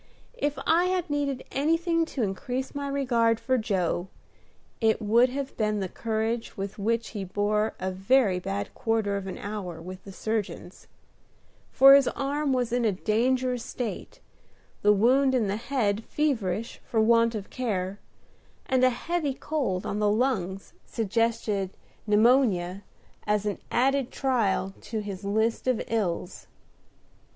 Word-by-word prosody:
If 290 0 -1
I 340 +2 +4
had 365 -3 -1
needed 280 -3 -1
anything 330 +4 +1
to 270 -6 -3
increase 245 +7 -3
my 285 -1 -3
regard 240 -5 +1
for 260 - +1
Joe, 190 -4 -1 0.7
it 220 -2 +2
would 235 +3 +4
have 275 +1 -4
been 215 -1 0
the 190 - -2
courage 225 +3 -2
with 195 +1 -5
which 230 +1 0
he 205 - -5
bore 205 +3 0
a 185 +1 -2
very 195 +1 +2
bad 195 +3 -4
quarter 225 -3 0
of 195 -1 -4
an 190 - -5
hour 200 -5 -5
with 185 +2 -9
the 195 - -10
surgeons; 205 -3 -4 0.8
for 270 +1 +8
his 275 -1 +6
arm 280 +1 -1
was 245 -3 0
in 245 0 +1
a 220 - +3
dangerous 245 +5 0
state, 240 -4 -6 0.6
the 210 - +5
wound 260 +6 +4
in 240 -4 +2
the 200 0 -1
head 225 -3 -1
feverish 230 -8 -1
for 225 - -1
want 230 +1 +4
of 200 -2 -6
care; 200 -6 -2 0.7
and 260 -1 +1
a 255 - +7
heavy 295 +2 -2
cold 255 -15 -2
on 205 - -2
the 210 -1 +3
lungs 205 -5 -1
suggested 220 -3 -1 0.3
pneumonia 210 -5 +3 0.5
as 210 0 +1
an 205 - -2
added 270 +1 +2
trial 215 -8 0
to 220 -2 -4
his 200 -2 -6
list 220 +5 0
of 255 -3 +2
ills. 195 -5 -2
225 Hz, 145 wpm, -27 LUFS, 200-260 Hz, 0.8 s, for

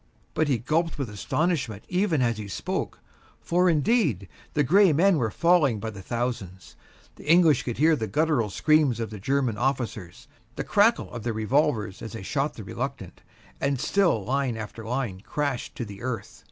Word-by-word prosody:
But 155 - +1
he 135 -4 +2
gulped 160 +9 -1
with 135 -7 -4
astonishment 120 - -1
even 180 -6 +1
as 115 -2 0
he 105 - -6
spoke, 95 - -4 0.4
for, 180 +1 +2
indeed, 155 - +1 0.3
the 145 - +3
gray 190 +6 +5
men 180 +4 +4
were 115 -3 0
falling 150 - +3
by 110 +2 -4
the 100 -2 -9
thousands. 115 -4 -4 0.4
The 150 - -1
English 165 -7 +5
could 120 -1 -4
hear 160 +3 +4
the 110 -6 -3
guttural 150 -7 +1
scream 155 +7 +3
of 115 -1 -5
the 105 - -7
German 130 0 0
officers, 120 -8 -3 0.3
the - - -3
crackle 210 +3 +2
of 120 - -5
their 115 +1 -2
revolvers 110 -2 0
as 110 - -7
they 115 -4 -7
shot - - -1
the - - -8
reluctant; - - -6 0.4
and 140 -2 0
still 160 - +1
line 130 -2 -1
after 110 +1 -7
line 115 -4 -3
crashed 140 +2 -3
to 120 - -4
the 100 -2 -10
earth. 120 -5 -5
130 Hz, 180 wpm, -26 LUFS, 110-155 Hz, 0.4 s, gray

